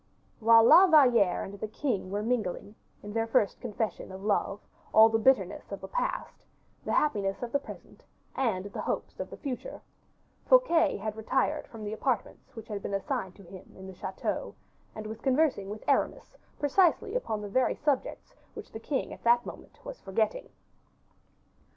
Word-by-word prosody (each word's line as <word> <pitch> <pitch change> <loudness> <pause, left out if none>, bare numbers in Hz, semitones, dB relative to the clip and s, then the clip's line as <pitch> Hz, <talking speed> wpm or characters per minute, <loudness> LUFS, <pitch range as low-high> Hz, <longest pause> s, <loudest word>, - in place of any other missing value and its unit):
While 230 0 +7
La 360 +11 +8
Valliere 245 - +5
and 200 +1 -8
the 215 - -3
king 215 -4 -2
were 205 +2 -2
mingling, 215 -4 -2 0.3
in 205 0 -7
their 225 0 0
first 210 -3 +1
confession 210 -3 -4
of 190 +1 -9
love, 205 -1 0 0.4
all 220 +1 +9
the 225 0 +1
bitterness 265 +4 +1
of - - -5
the - - -8
past, - - -3 0.4
the - - -3
happiness 205 -8 0
of 240 - -4
the 280 - +1
present, - - -12 0.3
and 215 -8 0
hopes 205 - -4
of - - -4
the - - -9
future, 280 - -6 0.7
Fouquet 345 -12 +4
had 210 +1 -4
retired 230 +4 -1
to 230 - -10
the 210 -1 -5
apartments 235 +1 -3
which 225 -1 -9
had 205 -2 -5
been 200 - -3
assigned 195 -3 -3
to 200 - -15
him 185 +1 -13
in 190 - -10
the 190 - -9
chateau, 185 +1 -4 0.4
and 215 - -7
was 220 +1 -7
conversing 265 -7 +1
with 215 +1 -8
Aramis - - 0 0.2
precisely 330 +5 +2
upon 225 - -2
the - - -5
very 255 +6 +1
subjects 290 -4 -2 0.2
which - - -9
the 220 - -7
king 270 +4 -3
at - - -13
that 240 +1 +4
moment - - -11
was - - -8
forgetting. 220 - -1
225 Hz, 175 wpm, -29 LUFS, 200-270 Hz, 0.7 s, all